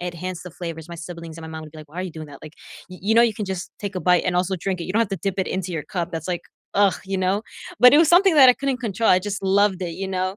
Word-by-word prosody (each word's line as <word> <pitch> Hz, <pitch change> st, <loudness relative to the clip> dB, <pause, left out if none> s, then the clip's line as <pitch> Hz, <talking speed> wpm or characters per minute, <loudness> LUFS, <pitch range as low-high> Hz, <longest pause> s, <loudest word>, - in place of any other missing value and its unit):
enhance 180 Hz, 0 st, -5 dB
the 180 Hz, -, -9 dB
flavors. 165 Hz, -2 st, -7 dB
My 170 Hz, -, -7 dB
siblings 170 Hz, -1 st, -8 dB
and 165 Hz, -, -10 dB
my 160 Hz, -, -8 dB
mom 160 Hz, 0 st, -7 dB
would 155 Hz, -, -11 dB
be 155 Hz, -, -11 dB
like, 155 Hz, -1 st, -12 dB
"Why 160 Hz, -, -15 dB
are 185 Hz, -, -1 dB
you 185 Hz, -, -5 dB
doing 155 Hz, -1 st, -8 dB
that?" 140 Hz, -, -12 dB
Like, 155 Hz, 0 st, -11 dB, 0.4 s
y 185 Hz, -, -10 dB
you 215 Hz, +4 st, +1 dB
know, 235 Hz, -, +7 dB
you 230 Hz, -2 st, +2 dB
can 210 Hz, -, -4 dB
just 190 Hz, -2 st, -5 dB
take 200 Hz, -1 st, -5 dB
a -, -, -2 dB
bite 180 Hz, -1 st, +3 dB
and 180 Hz, -, 0 dB
also 185 Hz, +1 st, +1 dB
drink 185 Hz, 0 st, -3 dB
it. -, -, -4 dB
You 185 Hz, -, -4 dB
don't 220 Hz, -, +2 dB
have 230 Hz, -, +1 dB
to 195 Hz, -, -2 dB
dip 195 Hz, +3 st, -2 dB
it 190 Hz, -, 0 dB
into 185 Hz, -1 st, -3 dB
your 160 Hz, -, -3 dB
cup, 175 Hz, 0 st, -4 dB
that's 165 Hz, +1 st, -5 dB
like 175 Hz, -1 st, -2 dB, 0.3 s
ugh, 200 Hz, -1 st, +4 dB
you 195 Hz, 0 st, -3 dB
know, 190 Hz, +3 st, 0 dB, 0.4 s
but 250 Hz, +3 st, +8 dB
it -, -, +7 dB
was 325 Hz, -1 st, +5 dB
something 360 Hz, +1 st, +5 dB
that 275 Hz, -4 st, +8 dB
I -, -, +5 dB
couldn't 275 Hz, 0 st, -2 dB
control. 225 Hz, -2 st, -1 dB
I 180 Hz, -, +6 dB
just 200 Hz, +1 st, -4 dB
loved 195 Hz, 0 st, +2 dB
it, 175 Hz, -2 st, -3 dB
you 195 Hz, -, -4 dB
know? 185 Hz, +1 st, -2 dB
185 Hz, 335 wpm, -22 LUFS, 170-200 Hz, 0.4 s, but